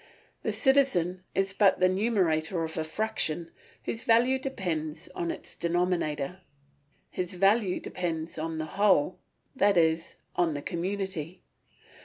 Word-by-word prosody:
The -, -, -1 dB
citizen 185 Hz, -, +2 dB
is 195 Hz, 0 st, +1 dB
but 200 Hz, -1 st, +4 dB
the 185 Hz, -, +5 dB
numerator 185 Hz, -5 st, +1 dB
of 160 Hz, 0 st, -4 dB
a 160 Hz, -, -1 dB
fraction, 170 Hz, -2 st, -1 dB, 0.3 s
whose 225 Hz, -, -3 dB
value 245 Hz, +3 st, +4 dB
depends 170 Hz, -, -3 dB
on 170 Hz, -, -3 dB
its -, -, -5 dB
denominator; 175 Hz, -2 st, -1 dB, 0.7 s
his 180 Hz, 0 st, -3 dB
value 195 Hz, +1 st, +3 dB
depends 165 Hz, -3 st, -4 dB
upon 160 Hz, 0 st, -3 dB
the 155 Hz, -, -2 dB
whole, 185 Hz, -1 st, +2 dB, 0.4 s
that 200 Hz, -6 st, +3 dB
is, 165 Hz, 0 st, +2 dB, 0.2 s
on 170 Hz, -4 st, +1 dB
the 145 Hz, -, -5 dB
community. 185 Hz, -2 st, -3 dB
180 Hz, 130 wpm, -28 LUFS, 160-200 Hz, 0.7 s, the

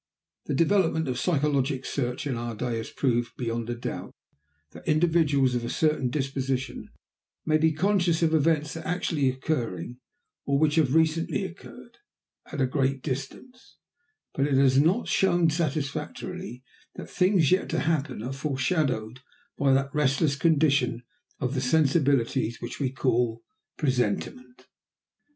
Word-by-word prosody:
The 145 Hz, -, -1 dB
development 165 Hz, 0 st, +2 dB
of 125 Hz, -1 st, -2 dB
psychologic 140 Hz, -5 st, +1 dB
research 125 Hz, -2 st, -3 dB
in 135 Hz, -4 st, -1 dB
our 120 Hz, -1 st, -4 dB
day 120 Hz, +1 st, -2 dB
has 115 Hz, -, -5 dB
proved 120 Hz, -3 st, -1 dB
beyond 115 Hz, -1 st, -3 dB
a 120 Hz, -, -2 dB
doubt 120 Hz, -, -6 dB, 0.6 s
that -, -, -13 dB
individuals 155 Hz, -5 st, +3 dB
of 120 Hz, -1 st, -1 dB
a 120 Hz, -, -3 dB
certain 150 Hz, -5 st, +1 dB
disposition 135 Hz, -2 st, -3 dB, 0.6 s
may 155 Hz, 0 st, +3 dB
be 160 Hz, +1 st, +3 dB
conscious 175 Hz, 0 st, +1 dB
of 160 Hz, -1 st, +2 dB
events 155 Hz, -1 st, +1 dB
actually 160 Hz, -4 st, -1 dB
occurring, 125 Hz, -, -3 dB, 0.4 s
or 140 Hz, 0 st, +1 dB
which 150 Hz, 0 st, +2 dB
have 150 Hz, -3 st, +3 dB
recently 160 Hz, +4 st, +1 dB
occurred, 190 Hz, -, -11 dB, 0.5 s
at -, -, -5 dB
a 130 Hz, -, +3 dB
great 135 Hz, 0 st, -1 dB
distance; 155 Hz, -, -7 dB, 0.6 s
but 140 Hz, +1 st, +1 dB
it 140 Hz, -, +1 dB
has 135 Hz, 0 st, +4 dB
not 185 Hz, +10 st, +1 dB
shown 175 Hz, -4 st, +3 dB
satisfactorily 155 Hz, 0 st, -4 dB, 0.3 s
that -, -, -8 dB
things 180 Hz, -5 st, +2 dB
yet 185 Hz, -, +2 dB
to -, -, 0 dB
happen 155 Hz, -8 st, -1 dB
are 130 Hz, +3 st, -4 dB
foreshadowed 130 Hz, -4 st, -1 dB, 0.4 s
by 140 Hz, -1 st, +2 dB
that 135 Hz, +1 st, +1 dB
restless 140 Hz, 0 st, +2 dB
condition 140 Hz, -6 st, +2 dB, 0.4 s
of 125 Hz, +1 st, -2 dB
the 130 Hz, -, -1 dB
sensibilities 135 Hz, -4 st, +2 dB
which 120 Hz, -, -7 dB
we 135 Hz, -3 st, 0 dB
call 120 Hz, -3 st, 0 dB, 0.3 s
presentiment. 140 Hz, -, -2 dB
140 Hz, 140 wpm, -26 LUFS, 130-160 Hz, 0.6 s, has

